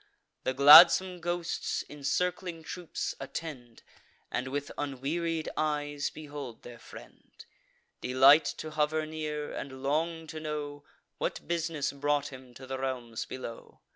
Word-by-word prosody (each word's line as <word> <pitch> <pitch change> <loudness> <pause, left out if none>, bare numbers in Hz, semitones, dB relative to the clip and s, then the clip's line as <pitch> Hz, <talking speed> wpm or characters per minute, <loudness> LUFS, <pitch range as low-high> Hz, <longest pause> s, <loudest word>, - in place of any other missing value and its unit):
The 130 - 0
gladsome 170 +6 +9
ghosts, 175 0 -2
in 150 -1 -12
circling 175 +3 -1
troops, 175 +1 -4
attend 135 -4 -7 0.5
And 125 - -2
with 145 +2 -4
unwearied 155 +4 -2
eyes 145 -1 -1
behold 145 -6 -9
their 120 -1 -11
friend; - - -14 0.7
Delight 135 +5 +6
to 155 - -6
hover 155 +1 0
near, 155 -1 -4
and 130 -1 -7
long 160 +3 -1
to 155 0 -7
know 150 -2 -5 0.4
What - - -3
bus'ness 165 -3 -1
brought 145 0 0
him 130 -2 -13
to 130 - -10
the 130 0 -5
realms 125 -4 -4
below. 120 -3 -9
145 Hz, 130 wpm, -30 LUFS, 135-160 Hz, 0.7 s, gladsome